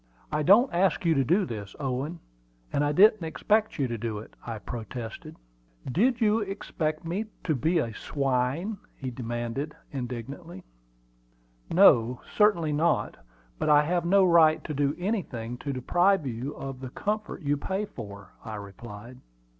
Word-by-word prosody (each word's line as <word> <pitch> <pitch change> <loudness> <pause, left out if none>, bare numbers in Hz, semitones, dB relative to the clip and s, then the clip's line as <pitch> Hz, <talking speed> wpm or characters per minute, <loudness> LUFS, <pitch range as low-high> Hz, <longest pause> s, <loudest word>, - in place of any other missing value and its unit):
"I 150 0 0
don't 205 - +5
ask 180 0 +2
you 165 - +4
to 135 -3 +2
do 180 - +2
this, 105 -5 -7
Owen; 140 +5 -3 0.5
and 145 - +2
I 145 - +2
didn't 210 +4 +6
expect 210 +7 +1
you 140 -4 +1
to 115 -2 -4
do 110 -1 -3
it," 105 - -10
I 115 -2 -5
protested. 115 +1 -7 0.6
"Did 230 - +2
you 220 -1 +3
expect 165 -6 -3
me 185 +7 -2 0.2
to 160 - +1
be 160 +6 +1
a 115 -8 0
swine?" 140 - -1 0.3
demanded 120 +4 -4 0.2
he 140 - -4
indignantly. 125 - -7 1.1
"No, 125 - +5 0.2
certainly 190 -7 +4
not; 160 +3 +1 0.4
but - - 0
I 150 0 +6
have 175 +3 0
no 190 +2 +5
right 165 -3 +5
to 155 - -4
do 145 +1 +1
anything 170 - -3
to 140 - -3
deprive 175 +7 +2
you 125 +3 -4
of 135 -1 -6
the 130 -1 -6
comfort 210 +4 -3
you 145 0 +2
pay 190 +8 -2
for," 100 - -10
I 110 - -6
replied. 105 +4 -10
150 Hz, 155 wpm, -27 LUFS, 120-180 Hz, 1.1 s, didn't